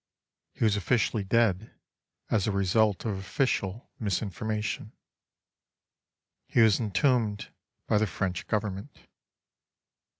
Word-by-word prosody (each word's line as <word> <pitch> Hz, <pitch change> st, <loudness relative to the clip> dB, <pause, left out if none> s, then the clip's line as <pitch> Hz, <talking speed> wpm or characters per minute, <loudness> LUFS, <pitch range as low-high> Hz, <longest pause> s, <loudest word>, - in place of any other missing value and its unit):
He -, -, -2 dB
was 110 Hz, -3 st, +4 dB
officially 105 Hz, +1 st, +1 dB
dead 110 Hz, -1 st, +1 dB, 0.6 s
as 105 Hz, -3 st, +2 dB
a -, -, +1 dB
result 100 Hz, +2 st, +2 dB
of 100 Hz, -4 st, -2 dB
official 100 Hz, 0 st, -2 dB
misinformation. 105 Hz, +1 st, -3 dB, 1.5 s
He 120 Hz, -, +3 dB
was 110 Hz, -3 st, +5 dB
entombed 110 Hz, 0 st, +1 dB, 0.4 s
by 105 Hz, -, +2 dB
the 110 Hz, -, +1 dB
French 95 Hz, -1 st, -3 dB
Government. 105 Hz, +4 st, -3 dB
105 Hz, 100 wpm, -28 LUFS, 100-110 Hz, 1.5 s, was